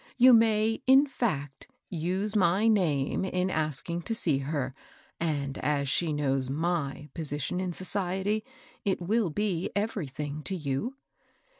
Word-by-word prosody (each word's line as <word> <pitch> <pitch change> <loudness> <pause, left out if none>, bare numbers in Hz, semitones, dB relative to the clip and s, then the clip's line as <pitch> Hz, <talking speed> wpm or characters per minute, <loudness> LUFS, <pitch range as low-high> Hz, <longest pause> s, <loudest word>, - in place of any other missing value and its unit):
You 255 0 +8
may, 225 -1 +3
in 265 +2 +7
fact, 150 - -3 0.2
use 185 +5 -2
my 190 +2 +3
name 165 -12 +2
in 185 0 0
asking 155 +2 -2
to 225 - 0
see 155 -11 +1
her, 135 -2 -2 0.5
and 145 -4 -2
as 140 0 0
she 165 +3 +3
knows 135 -3 0
my 150 -1 -2
position 150 +2 -2
in 185 -1 -2
society, 190 +3 -1 0.4
it 195 -2 0
will 200 +2 +1
be 185 0 -1
everything 150 -8 -3
to 195 - -1
you." 155 - -2
175 Hz, 135 wpm, -28 LUFS, 145-205 Hz, 0.5 s, You